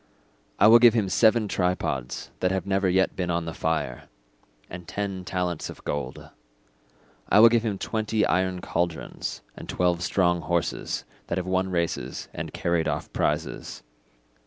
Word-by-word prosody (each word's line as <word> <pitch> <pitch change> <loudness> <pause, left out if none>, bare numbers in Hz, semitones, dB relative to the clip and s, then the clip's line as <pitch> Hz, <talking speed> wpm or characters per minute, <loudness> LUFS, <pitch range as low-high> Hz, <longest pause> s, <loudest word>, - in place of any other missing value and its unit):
I - - +5
will 115 +2 +9
give 120 -1 +7
him 105 -4 +1
seven 110 +1 +4
tripods 90 -10 -2
that 90 - +2
have 95 -2 -1
never 95 -1 +1
yet 95 +1 +2
been 90 -2 -2
on 85 -1 0
the 80 - -5
fire, 80 -3 -2 0.6
and 90 -1 -9
ten 100 -2 -3
talents 90 -3 -2
of - - -10
gold. 70 -3 -5 1.0
I 105 - +6
will 115 +2 +9
give 115 0 +3
him 110 -4 -2
twenty 110 +1 0
iron 95 0 0
cauldrons 85 -1 -3
and - - -10
twelve 90 -1 +1
strong 90 -3 +2
horses 85 +1 -2 0.2
that 85 - -2
have 90 - -2
won 95 0 0
races 85 -2 -2
and - - -5
carried 85 -2 0
off - - -3
prizes. - - -2
90 Hz, 160 wpm, -26 LUFS, 85-100 Hz, 1.0 s, will